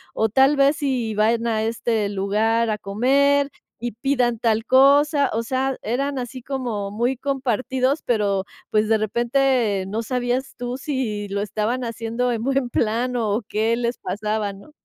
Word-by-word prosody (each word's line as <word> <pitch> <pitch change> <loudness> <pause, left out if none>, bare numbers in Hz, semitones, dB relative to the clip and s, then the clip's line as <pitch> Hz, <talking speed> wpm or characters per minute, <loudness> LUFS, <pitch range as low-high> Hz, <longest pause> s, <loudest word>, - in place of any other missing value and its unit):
o 220 - +2
tal 270 +6 +4
vez 275 +2 +4
sí 255 -6 -1
vayan 225 +2 +2
a 220 -1 0
este 225 -2 -1
lugar 215 +4 +1
a 215 - 0
comer 280 +8 +2 0.3
y 240 +1 -3
pidan 240 -1 0
tal 225 0 +1
cosa", 280 +2 +5
o 225 +1 -1
sea, 260 +2 -1
eran 275 +5 -1
así 250 +1 -6
como 240 -6 -3
muy 240 +5 0
compartidos, 265 +1 -1
pero, 205 -5 +1 0.3
pues, 215 0 +2
de 220 - +4
repente 235 -2 +1
no 215 +3 -2
sabías 250 +2 -2
tú 245 +1 -4
si 255 -8 -3
lo 200 +1 -2
estaban 215 +4 -2
haciendo 230 +1 -2
en 230 -1 -2
buen 270 -1 0
plan 235 +3 0
o 220 0 0
qué 220 +2 +1
les 240 0 -2
pasaba, 210 +2 -2
¿no? 200 +10 -15
235 Hz, 160 wpm, -22 LUFS, 215-265 Hz, 0.3 s, cosa